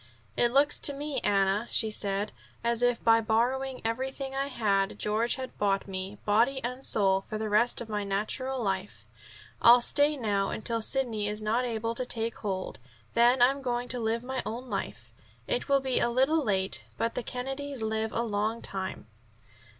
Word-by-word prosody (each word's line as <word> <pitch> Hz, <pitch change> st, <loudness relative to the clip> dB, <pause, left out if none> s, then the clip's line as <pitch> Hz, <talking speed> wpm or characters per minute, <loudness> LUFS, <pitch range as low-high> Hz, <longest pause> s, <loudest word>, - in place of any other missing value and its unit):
"It 240 Hz, -, +3 dB
looks 280 Hz, +3 st, +4 dB
to 285 Hz, -, +2 dB
me, 285 Hz, -1 st, -2 dB
Anna," 200 Hz, +2 st, +1 dB
she 220 Hz, -1 st, +2 dB
said, 200 Hz, -1 st, -1 dB, 0.3 s
"as 235 Hz, 0 st, +1 dB
if 245 Hz, -1 st, +1 dB
by 225 Hz, 0 st, +5 dB
borrowing 250 Hz, +4 st, 0 dB
everything 265 Hz, +3 st, -3 dB
I 275 Hz, +1 st, -1 dB
had 200 Hz, -7 st, 0 dB
George 220 Hz, +3 st, 0 dB
had 260 Hz, -1 st, -7 dB
bought 195 Hz, -1 st, +1 dB
me, 190 Hz, +1 st, -5 dB
body 235 Hz, +6 st, +3 dB
and 250 Hz, +2 st, -4 dB
soul, 195 Hz, -5 st, +2 dB
for 215 Hz, -, -6 dB
the 215 Hz, 0 st, -3 dB
rest 225 Hz, +4 st, +3 dB
of 235 Hz, -, -6 dB
my 210 Hz, -2 st, -2 dB
natural 215 Hz, +7 st, -2 dB
life. 195 Hz, -1 st, -3 dB, 0.6 s
I'll 240 Hz, +1 st, +8 dB
stay 290 Hz, +4 st, +4 dB
now 205 Hz, -5 st, 0 dB
until 230 Hz, +1 st, -2 dB
Sidney 225 Hz, -4 st, 0 dB
is 210 Hz, +1 st, -3 dB
able 230 Hz, 0 st, -1 dB
to 255 Hz, -, -2 dB
take 230 Hz, -2 st, -2 dB
hold. 190 Hz, -3 st, -4 dB, 0.3 s
Then 240 Hz, +1 st, +5 dB
I'm 275 Hz, +3 st, +3 dB
going 245 Hz, -1 st, -2 dB
to 250 Hz, -, +2 dB
live 230 Hz, +1 st, -1 dB
my 260 Hz, 0 st, -3 dB
own 240 Hz, +3 st, -6 dB
life. -, -, -5 dB, 0.3 s
It -, -, -2 dB
will 275 Hz, -1 st, +4 dB
be 260 Hz, -2 st, +1 dB
a 240 Hz, -, +2 dB
little 270 Hz, +6 st, +2 dB
late, 190 Hz, -5 st, 0 dB
but 230 Hz, -, -1 dB
the -, -, -2 dB
Kennedys 270 Hz, +1 st, -4 dB
live 220 Hz, 0 st, -1 dB
a 235 Hz, -, -1 dB
long 220 Hz, +1 st, -2 dB
time." 190 Hz, -, -3 dB
230 Hz, 180 wpm, -28 LUFS, 210-260 Hz, 0.6 s, I'll